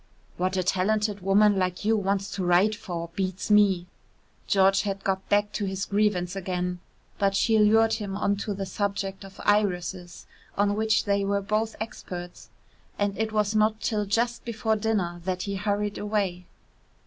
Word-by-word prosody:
"What 185 +1 -1
a 185 - +1
talented 205 +3 0
woman 200 +1 +4
like 185 +1 -2
you 225 +1 +3
wants 200 -1 -1
to 195 - -3
write 180 +4 +4
for 170 -5 -6
beats 190 +2 -3
me." 200 -4 +4 0.6
George 195 0 +4
had 195 -1 -4
got 190 0 -2
back 205 0 +2
to 205 - -2
his 190 0 -3
grievance 200 -3 0
again, 180 -1 -3 0.4
but 195 -1 +2
she 220 +2 +3
lured 225 +1 +5
him 200 -2 -3
on 200 0 +1
to 205 0 -3
the 195 0 -4
subject 195 0 -3
of 195 0 -13
irises 180 -4 0 0.3
on 205 0 +2
which 220 0 +1
they 200 -1 +1
were 200 0 +1
both 215 +3 -1
experts, 175 -5 -7 0.5
and 205 -1 0
it 220 +1 -1
was 210 -1 +1
not 215 0 +2
till 210 -2 -1
just 235 +4 0
before 225 -1 -1
dinner 200 -6 -1
that 185 0 -2
he 200 - -3
hurried 205 +1 -1
away. 200 -4 -2
200 Hz, 170 wpm, -26 LUFS, 185-210 Hz, 0.6 s, lured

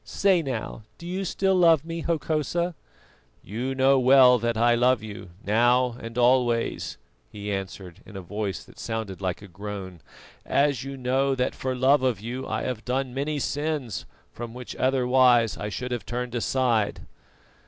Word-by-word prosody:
Say 190 -3 +2
now, 130 -6 -4 0.2
do 170 - -11
you 185 +3 -3
still 190 +1 +1
love 165 -4 +5
me, 165 0 -4
Hokosa?" 165 +1 -1 0.7
"You 125 +7 -4
know 135 +1 +4
well 130 -1 +6
that 115 0 -1
I 120 +1 +4
love 125 -1 +3
you, 105 -4 -8 0.2
now 120 +4 +3
and 115 +1 -8
always," 120 -1 +2 0.3
he 105 0 -5
answered, 95 -3 -6
in 105 - -14
a - - -5
voice 105 +1 -4
that - - -18
sounded 110 -5 -4
like 95 +1 -3
a - - -10
groan; 95 -2 -7 0.4
"as 140 -3 +1
you 135 0 -6
know 135 +2 +1
that 125 -1 0
for 130 -1 -3
love 130 +3 +4
of 125 -6 0
you 120 +5 -5
I 110 0 -2
have 125 -4 -4
done 130 0 -2
many 145 +3 -2
sins 145 - -3 0.3
from 120 0 -7
which 125 -1 -8
otherwise 125 -3 +3
I 105 - -4
should 125 +4 -5
have 120 -2 -4
turned 120 +1 -4
aside." 120 -3 0
125 Hz, 165 wpm, -25 LUFS, 110-135 Hz, 0.7 s, well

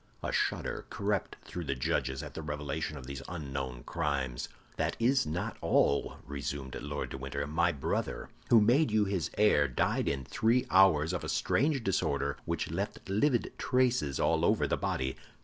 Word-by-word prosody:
A - - -1
shudder - - -1
crept 100 -2 -1
through 90 -2 -6
the 70 - -1
judges 65 +2 -1
at 75 - -8
the - - -5
revelation 75 0 -3
of 65 - -9
these 70 +1 -6
unknown 70 -7 -4
crimes. 70 -7 -2 0.3
"That - - 0
is 130 - +3
not 80 +4 -3
all," 70 - +2
resumed 70 -1 -4
Lord 75 0 -4
de 65 - -5
Winter. 70 +2 -3
"My 80 +4 +2
brother, 70 - -2 0.2
who 115 - +8
made 125 +7 +4
you 105 -1 +3
his 95 -5 -1
heir, 105 -9 +5
died 65 - 0
in 70 -2 -2
three 120 - +2
hours 90 -4 +5
of 90 - -2
a - - -4
strange 140 0 +1
disorder 75 -8 0
which - - -2
left 100 +4 -4
livid 120 +6 +1
traces 125 - +1
all - - +2
over - - +3
the - - +1
body. 65 0 -2
75 Hz, 170 wpm, -31 LUFS, 70-105 Hz, 0.3 s, who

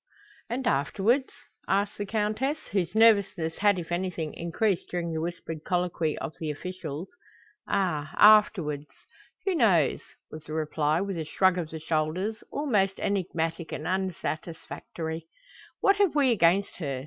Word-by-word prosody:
"And 250 +2 -2
afterwards?" 205 - +1 0.4
asked 200 +1 0
the 205 - -3
Countess, 220 +8 0
whose 190 -1 -1
nervousness 200 -7 +3
had 205 -1 +4
if 175 -1 -6
anything 175 -3 -2
increased 175 +3 -1
during 170 -2 -2
the 160 - -2
whispered 165 -2 -5
colloquy 175 -3 0
of 155 - -5
the 160 - -3
officials. 165 +1 -5 0.6
"Ah, 155 -6 0
afterwards! 180 -9 +5 0.6
Who 390 - +2
knows?" 190 - +3 0.3
was 155 -1 -9
the 155 - -7
reply, 155 +1 0
with 195 -3 -3
a 160 - -3
shrug 185 +3 +2
of 165 -3 -4
the 160 - -6
shoulders, 165 +7 -1
all 290 - -3
most 195 -7 +1
enigmatic 170 -4 -2
and 155 - -5
unsatisfactory. 165 -3 -4 0.5
"What 395 0 +4
have 400 -6 +3
we 275 -4 +4
against 195 -1 +3
her?" 140 -6 -3
180 Hz, 145 wpm, -27 LUFS, 160-205 Hz, 0.6 s, afterwards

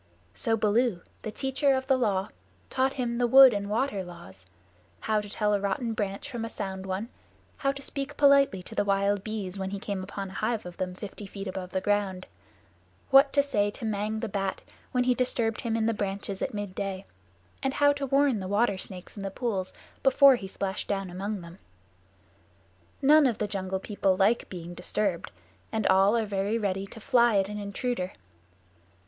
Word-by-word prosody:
So 225 -2 0
Baloo, 215 -2 +2 0.2
the - - -4
Teacher 270 +4 +1
of 260 0 -2
the 265 0 +3
Law, 205 -6 0 0.4
taught 265 +1 +1
him 240 -2 -2
the 245 - +3
Wood 265 0 +9
and 200 0 -3
Water 215 -3 0
Laws: 135 - -12 0.5
how 215 -1 +1
to 205 - -9
tell 210 0 0
a 205 - +2
rotten 205 +4 -1
branch 200 +3 -3
from 240 -5 -5
a 230 - -3
sound 190 -3 -5
one; 190 +5 -3 0.5
how 275 - +1
to 275 0 -8
speak 280 +1 -3
politely 280 -9 +5
to - - -11
the - - +1
wild 200 0 +1
bees 200 -3 -4
when 190 0 -2
he 200 - -4
came 195 -1 -4
upon 195 0 -6
a - - -11
hive 215 +1 -1
of 175 -1 -9
them 185 -1 -3
fifty 205 +1 -8
feet 195 0 -7
above 185 -1 -6
ground; 200 -3 0 0.9
what 275 +1 +7
to 280 - +4
say 205 -8 +1
to 225 +3 -7
Mang 215 +1 -2
the 230 - -2
Bat 195 -2 -3 0.3
when 250 -1 +2
he 250 0 +3
disturbed 235 -3 0
him 230 -2 -1
in 220 - +1
the 230 - +2
branches 200 -1 -4
at - - -1
midday; 195 -1 -4 0.6
and 270 0 -1
how 285 0 +5
to 280 -1 -4
warn 275 -3 +3
the 190 - -5
water 205 0 +1
snakes 185 -1 -6
in 205 - -7
the 195 - -3
pools 195 -3 -2 0.3
before 270 0 +7
he 200 -5 -6
splashed 190 0 -4
down 195 -2 -2
among 200 +2 -4
them. 170 +2 -12 1.4
None 295 +1 +7
of 235 - -1
the 210 - -1
Jungle 190 -2 -3
People 195 -2 0
like 210 +5 +2
being 175 -1 -7
disturbed, 180 0 -1 0.4
and 220 -2 -1
all 195 +4 +5
are 225 - 0
very 200 +2 -1
ready 195 -2 -2
to 225 - -11
fly 240 -3 +4
at 195 0 +1
an 210 0 -5
intruder. 200 -1 -3
205 Hz, 195 wpm, -28 LUFS, 195-240 Hz, 1.4 s, Wood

